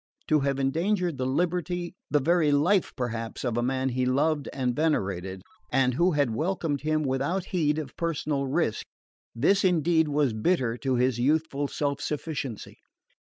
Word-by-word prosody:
To 155 - +4
have 140 -1 0
endangered 170 +3 0
the 130 - 0
liberty, 175 +4 -1 0.2
the 150 - +3
very 160 +1 +3
life, 170 +7 +3
perhaps, 115 -3 -4
of 120 -3 -1
a 120 - +1
man 130 +2 0
he 130 0 -1
loved 145 +3 +1
and 125 -3 -1
venerated, 95 - -1 0.3
and 130 -1 +3
who 175 +7 +2
had 140 -6 +1
welcomed 160 0 -1
him 155 +1 0
without 140 +8 -1
heed 155 -4 +2
of 150 -5 -5
personal 150 -4 -1
risk, 135 -5 -1 0.5
this 195 +12 +3
indeed 165 -3 +3
was 145 -4 +1
bitter 115 0 +1
to 130 0 -1
his 125 -1 +1
youthful 145 +1 +1
self 140 0 -2
sufficiency. 145 -6 -4
145 Hz, 160 wpm, -27 LUFS, 130-160 Hz, 0.5 s, To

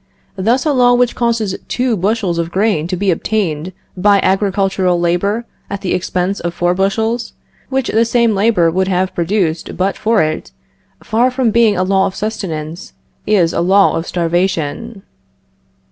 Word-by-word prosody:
Thus 230 +8 +1
a 300 - +2
law 245 -2 +4
which 245 -1 +2
causes 230 -5 -1
two 250 -2 0
bushels 195 -2 -1
of 165 0 -2
grain 190 -4 0
to 180 - -2
be 195 0 +1
obtained 175 -3 -2 0.2
by 200 +2 +3
agricultural 190 -2 +1
labor 200 +7 0 0.2
at 200 -1 -5
the 185 - -1
expense 185 +2 -1
of 170 0 -4
four 175 0 +1
bushels, 220 +5 -1 0.4
which 265 -1 -1
the 225 +1 +2
same 235 -1 +2
labor 195 -5 +2
would 190 +2 0
have 185 0 0
produced 170 -2 -1
but 190 +2 0
for 220 -5 +2
it, 155 0 -3 0.5
far 235 +3 +2
from 255 -3 0
being 225 -3 +3
a 185 - +1
law 190 +1 +2
of 190 - -7
sustenance, 170 -6 -5 0.3
is 190 -6 +2
a - - 0
law 195 +3 +4
of 165 +1 -3
starvation. 180 +4 -2
195 Hz, 160 wpm, -16 LUFS, 175-225 Hz, 0.5 s, law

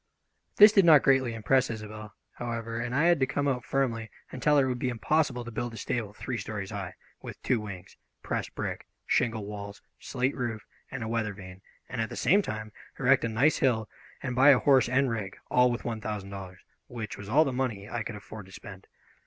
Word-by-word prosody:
This 210 +1 +9
did 200 -2 +5
not 160 -4 +7
greatly 130 -4 +3
impress 130 +4 +2
Isobel, 105 -2 -7 0.2
however, 115 -1 -4
and 120 +1 -3
I 145 - +3
had 170 -2 +4
to 130 - +2
come 145 +2 -1
out 125 -3 0
firmly 115 -5 -1 0.2
and 130 - -7
tell 150 +2 +4
her 135 - +4
it - - -1
would 125 -1 -2
be 125 - 0
impossible 125 +1 0
to 120 - -7
build 120 +1 -4
a - - -8
stable 110 0 -3
three 120 +3 -5
stories 100 -1 -5
high, 95 -4 -5 0.3
with - - -9
two 125 -3 +2
wings, 95 -4 -9 0.3
pressed - - -3
brick, - - -4 0.2
shingle 115 -4 0
walls, 100 0 -8 0.2
slate 130 +1 -1
roof, 115 -4 -4 0.2
and 130 -3 -5
a - - -4
weather 110 -3 -2
vane, 95 -1 -11 0.3
and 120 -2 -3
at 110 - -2
the - - -7
same 200 +3 +4
time 110 - -5 0.3
erect - - +3
a 115 - 0
nice 130 +8 +3
hill 115 -5 +1 0.4
and 125 -2 -3
buy 135 +3 +7
a 140 - +8
horse 135 -2 +4
and 130 0 +2
rig, 105 -4 -4
all 125 0 +5
with 120 -1 -4
one 115 -2 -3
thousand 105 -3 -5
dollars, 95 -2 -9 0.3
which 115 -4 -6
was 100 0 -9
all 150 +7 +5
the 135 - -2
money 120 -6 -2
I 120 +2 -3
could 110 0 -5
afford 105 -1 -10
to - - -15
spend. 95 0 -11
115 Hz, 220 wpm, -28 LUFS, 105-130 Hz, 0.4 s, This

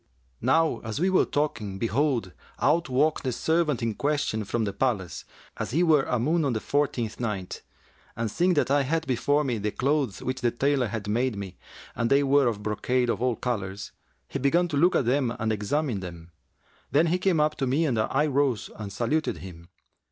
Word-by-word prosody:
Now 165 0 +2
as 110 +3 -5
we 185 +3 +2
were 185 - +4
talking, 115 -10 -2
behold, 115 -2 0 0.3
out 170 -1 +2
walked 145 +5 +2
the 130 - -1
servant 155 -1 0
in 115 -1 0
question 140 -5 -1
from 115 +3 -1
the 100 -2 -2
palace, 100 -7 -2 0.3
as - - -3
he 165 +7 +2
were 155 -5 +4
a 125 - 0
moon 155 +8 +1
on 135 -4 +1
the 110 - -1
fourteenth 125 -5 -1
night; 105 -6 -4 0.5
and, 115 -1 -2
seeing 180 - +2
that 145 -2 +1
I 145 0 +4
had 160 +4 -1
before 145 +4 +1
me 125 -6 -1
the 105 +1 -1
clothes 135 -2 -1
which 130 0 -3
the 120 - +3
tailor 135 +1 +1
had 105 -1 -5
made 120 +3 0
me, 95 -2 -6 0.4
and 115 0 0
they 140 +1 +4
were 140 -1 +4
of 105 -3 -2
brocade 120 +3 0
of - - -3
all 125 -2 +1
colours, 105 -5 -4 0.4
he 140 - -4
began 165 +7 +2
to 150 - -2
look 175 +6 +4
at 130 - +2
them 125 -1 +1
and 110 -1 0
examine 115 +3 -1
them. 85 -2 -9 0.6
Then 150 +4 +3
he 175 +2 +1
came 185 -3 +2
up 150 0 +2
to 135 - -1
me 145 +6 +2
and 125 -7 0
I 135 +7 +1
rose 135 -5 0
and 105 -2 -7
saluted 150 +9 -1
him. 85 -2 -11
130 Hz, 205 wpm, -26 LUFS, 110-150 Hz, 0.6 s, were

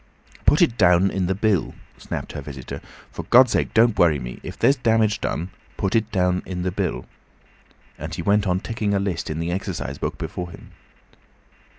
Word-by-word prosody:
"Put 150 - +6
it 120 -9 0
down 90 0 +5
in 95 -2 -1
the 95 - 0
bill," 100 -3 0 0.2
snapped - - -5
her - - -6
visitor. 65 -4 -8 0.3
"For - - -6
God's 125 0 +6
sake - - 0
don't 115 -1 +4
worry 80 -4 +5
me. 60 -2 -7
If - - -8
there's 140 - +4
damage 110 -4 +2
done, 90 +4 -3 0.3
put 95 +3 -1
it 110 -1 +1
down 90 -1 +1
in 90 -1 -5
the 95 - -1
bill," - - -2 0.9
and 80 +2 -6
he 85 - -4
went 100 +2 +2
on 90 0 +1
ticking 110 -3 -1
a - - +2
list 95 -3 -2
in 75 - -3
the 85 +1 -2
exercise 90 - -4
book - - -3
before 90 -1 -5
him. - - -13
95 Hz, 195 wpm, -23 LUFS, 85-110 Hz, 0.9 s, Put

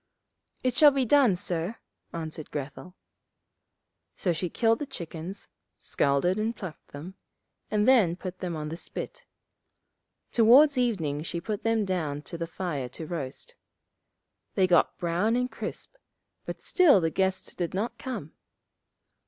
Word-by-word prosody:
'It 255 -1 +1
shall 300 +1 +8
be 270 -2 0
done, 255 -5 +5
sir!' 175 +2 -2 0.4
answered 160 -2 -6
Grethel. 145 +5 -6 1.2
So 180 - 0
she 170 +2 -2
killed 225 +5 +2
the 295 - -4
chickens, 175 - -6 0.3
scalded 160 +8 +1
and 225 +2 -1
plucked 185 -6 -8
them, 155 +7 -9 0.6
and 210 +1 +1
then 220 -10 +5
put 185 0 -7
them 175 -3 -3
on 150 -1 -4
the 165 - -5
spit; - - -7 1.1
towards 260 +6 +7
evening 185 - 0
she 170 +2 -4
put 205 +4 -4
them 225 -2 +1
down 155 -6 -2
to - - -7
the 165 0 -3
fire 165 -7 -3
to 160 +6 -7
roast. 155 - -6 1.0
They 190 - +4
got 175 -2 +3
brown 180 +7 +1
and 250 +1 0
crisp, - - -7 0.5
but - - -6
still 335 - +5
the 165 -2 0
guest 190 +1 -1
did 175 0 -3
not 215 +5 -2
come. 230 - -5
185 Hz, 145 wpm, -28 LUFS, 165-225 Hz, 1.2 s, shall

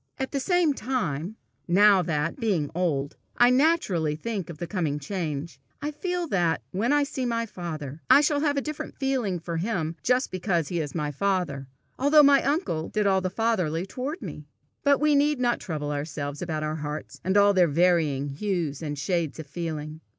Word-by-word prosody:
At 265 -1 -3
the 280 - -1
same 350 0 +2
time, 195 - -2 0.3
now 195 +2 +6
that, 160 - -2
being 190 - 0
old, 155 -6 -1 0.2
I 240 +1 +6
naturally 250 - +2
think 195 +2 -4
of 165 - -7
the 175 - -4
coming 165 -6 -1
change, 155 -1 -4 0.2
I 295 +1 -3
feel 355 +3 -2
that, 170 - +1
when 215 +8 0
I 290 0 +4
see 275 -2 -4
my 230 -1 0
father, 160 -7 -6
I 285 - +8
shall 295 -1 +2
have 290 -1 +1
a - - +2
different 305 0 -6
feeling 260 -9 0
for 165 0 -4
him 165 -4 -2
just 250 +2 +1
because 175 -4 -1
he 175 - -1
is 150 -1 -4
my 150 -3 -1
father, 150 -5 -1 0.3
although 295 +2 +6
my 280 -1 +6
uncle 275 - -1
did 210 -1 0
all 190 -1 +3
the 185 - -1
fatherly 180 -6 0
toward 260 - -5
me. 150 -5 -8 0.4
But 280 -1 +4
we 300 +1 +3
need 290 0 +3
not 240 -1 +1
trouble 150 -4 -4
ourselves 145 -1 -4
about 160 -3 -2
our 155 +1 -2
hearts, 150 0 -6
and 190 +3 +2
all 205 0 +6
their 180 -3 +5
varying 155 -3 +2
hues 165 -2 -2
and 145 -2 -4
shades 165 +1 -1
of 160 - -7
feeling. 155 0 -5
180 Hz, 190 wpm, -26 LUFS, 155-250 Hz, 0.4 s, I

